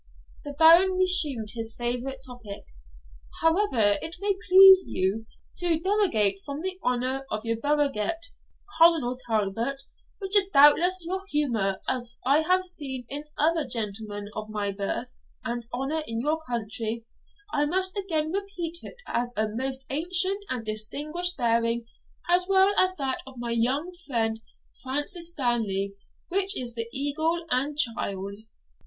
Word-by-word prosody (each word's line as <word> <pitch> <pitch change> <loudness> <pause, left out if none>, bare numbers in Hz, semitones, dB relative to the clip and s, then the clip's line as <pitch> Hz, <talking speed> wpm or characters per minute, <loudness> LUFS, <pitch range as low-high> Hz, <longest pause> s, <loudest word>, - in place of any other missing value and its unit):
The 290 - -7
Baron 335 +5 +6
resumed 320 - +3
his 225 -1 -3
favourite 245 +2 -3
topic 245 -5 -9 0.8
'However 300 - +3
it 325 +1 -5
may 400 0 0
please 380 0 +9
you 200 +4 -2 0.3
to 345 -2 +2
derogate 330 - +2
from 285 +2 -6
the 375 +1 -4
honour 255 +2 -1
of 215 +1 -4
your 230 0 0
burgonet, 295 +3 0 0.5
Colonel 320 -7 +4
Talbot, 225 +5 -1 0.3
which 390 0 -2
is 400 -2 +6
doubtless 345 +3 +5
your 380 +3 -3
humour, 230 - -1
as 245 -1 -2
I 280 +4 +4
have 370 +3 +1
seen 270 -8 -2
in 290 +2 -5
other 320 +1 +2
gentlemen 210 -3 -4
of 215 0 -6
birth 205 +4 -3 0.3
and 235 0 -4
honour 270 +6 -2
in 225 0 -3
your 300 +6 0
country, 225 -1 -3 0.5
I 290 - +2
must 370 +3 +1
again 320 -6 -1
repeat 365 -4 -4
it - - -10
as 240 0 -2
a 215 0 +1
most 265 +4 -4
ancient 365 +6 +2
and 245 -3 -4
distinguished 300 +12 -1
bearing, 230 -1 +1 0.4
as 355 +1 +3
well 385 0 +4
as 370 0 +3
that 270 -5 -2
of 265 -1 -12
my 235 0 -4
young 260 +9 0 0.2
friend 225 -4 0 0.4
Francis 290 +7 -1
Stanley, 225 - -1 0.4
which 390 +2 +2
is 245 -2 -3
the 230 0 -3
eagle 315 +5 -1
and 275 +4 0
child.' 200 -7 -1
270 Hz, 140 wpm, -26 LUFS, 230-340 Hz, 0.8 s, please